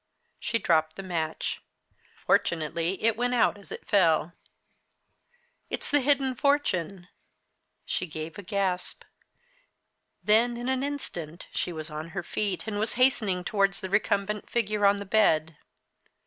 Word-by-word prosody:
She 230 - 0
dropped 160 -6 +2
the 195 - -7
match. 165 -4 -3 0.6
Fortunately 170 +3 +1
it 225 -1 +3
went 245 +2 0
out 235 - +3
as 200 - -11
it - - -8
fell. 170 -4 +3 1.4
"It's - - -3
the 290 - +5
hidden 270 -1 +2
fortune!" 195 - 0 0.8
She 185 - -2
gave 155 +2 -6
a - - -5
gasp. 190 -1 -2 1.2
Then 235 +3 +4
in 240 +2 -3
an 260 0 +1
instant 180 - -5
she - - -1
was 155 -1 -6
on 155 +2 -5
her 185 - -1
feet 200 +1 -2
and 210 -2 -3
was 220 +2 -1
hastening 220 -8 +2
towards 195 0 +1
the 190 -2 -6
recumbent 205 0 0
figure 210 -3 +2
on 200 +1 +4
the 200 - -6
bed. 160 -7 +2
200 Hz, 140 wpm, -27 LUFS, 170-230 Hz, 1.4 s, the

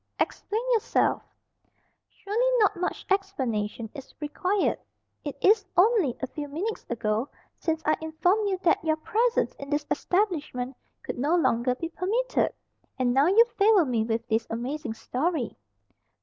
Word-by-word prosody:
"Explain 440 +3 -1
yourself." 455 -4 +2 0.9
"Surely 470 +6 0
not 415 -2 +4
much 360 0 -3
explanation 245 - -1
is 275 -3 -11
required. 365 +7 0 0.4
It 290 - -5
is 420 +1 +5
only 375 - +4
a 265 - -2
few 290 +3 -6
minutes 360 +10 -4
ago 225 +2 -1 0.3
since 320 -1 -1
I 310 - +4
informed 360 +7 +1
you 380 - 0
that 335 - +3
your 315 -1 +2
presence 455 +9 +1
in 280 - -7
this 295 0 0
establishment 300 -10 -1 0.3
could - - -5
no 295 +7 +2
longer 250 -6 +2
be 330 +5 -4
permitted, 425 +9 0 0.5
and 250 -2 +1
now 275 +4 +4
you 435 +6 +6
favour 405 -4 +6
me 240 -4 0
with 225 +1 -2
this 225 0 0
amazing 245 +2 -4
story." 275 +3 -2
315 Hz, 145 wpm, -27 LUFS, 255-395 Hz, 0.9 s, you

